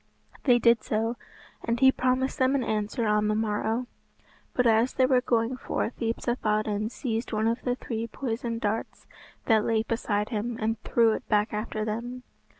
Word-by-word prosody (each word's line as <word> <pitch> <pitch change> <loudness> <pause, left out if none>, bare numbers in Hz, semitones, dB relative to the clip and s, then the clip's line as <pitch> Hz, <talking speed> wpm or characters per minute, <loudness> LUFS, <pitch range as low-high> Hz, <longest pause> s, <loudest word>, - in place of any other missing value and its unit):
They 245 -3 +6
did 235 -1 +4
so, 225 +2 -1 0.5
and 235 0 -1
he 265 0 +7
promised 255 +2 0
them 260 +1 +3
an 265 - +1
answer 215 +2 -1
on 210 0 +2
the 215 - +1
morrow. 220 +2 -1 0.7
But 250 - +2
as 230 +2 +3
they 260 - +3
were 255 -1 +3
going 235 +1 0
forth 245 - -3
Yspathaden 215 -2 -1
seized 230 -1 -3
one 220 0 +1
of 230 +2 0
the 245 -1 -1
three 230 -2 -4
poisoned 230 -1 -4
darts 215 +2 -3 0.4
that 220 -2 +4
lay 220 -1 +1
beside 210 -2 -1
him 230 0 -3
and 220 0 -1
threw 230 -2 +3
it 220 - -4
back 210 0 +2
after 215 0 -3
them. 240 +4 -4
230 Hz, 170 wpm, -27 LUFS, 215-245 Hz, 0.7 s, he